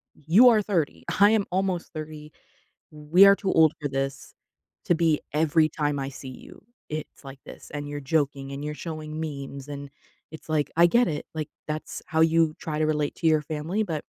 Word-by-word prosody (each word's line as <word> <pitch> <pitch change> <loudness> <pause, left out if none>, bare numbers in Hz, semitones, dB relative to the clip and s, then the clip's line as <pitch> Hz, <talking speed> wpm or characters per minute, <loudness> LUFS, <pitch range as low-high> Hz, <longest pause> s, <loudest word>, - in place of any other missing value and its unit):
you 180 - +5
are 220 -2 +4
30. 180 -7 -2 0.2
I 205 +2 +7
am 215 -3 +2
almost 185 -2 -1
30. 155 -1 -8 0.6
We 155 +6 +5
are 200 0 +7
too 195 -3 -2
old 160 -1 +5
for 145 - -1
this 135 0 -4 0.5
to 175 - +3
be 160 -2 +2
every 155 0 +3
time 145 -2 -2
I 135 0 -3
see 135 0 -10 0.2
you. - - -14 0.3
It's 155 0 -7
like 135 0 -10
this, - - -12
and 145 -1 -5
you're 145 0 -5
joking, 140 -2 0
and 140 +1 -6
you're 150 0 -4
showing 155 -1 -5
memes, 140 -2 -6
and 140 -1 -7 0.4
it's 160 - -11
like, 155 -2 0
I 170 +1 +7
get 240 +7 +3
it. 150 -2 -4
Like, 155 -2 -4 0.2
that's 155 0 -5
how 160 0 0
you 160 -1 +3
try 155 -1 -4
to 155 - +2
relate 150 -1 -1
to 165 - -2
your 155 -1 +3
family, 160 +7 -2
but" 160 -5 -4
155 Hz, 200 wpm, -25 LUFS, 145-165 Hz, 0.6 s, I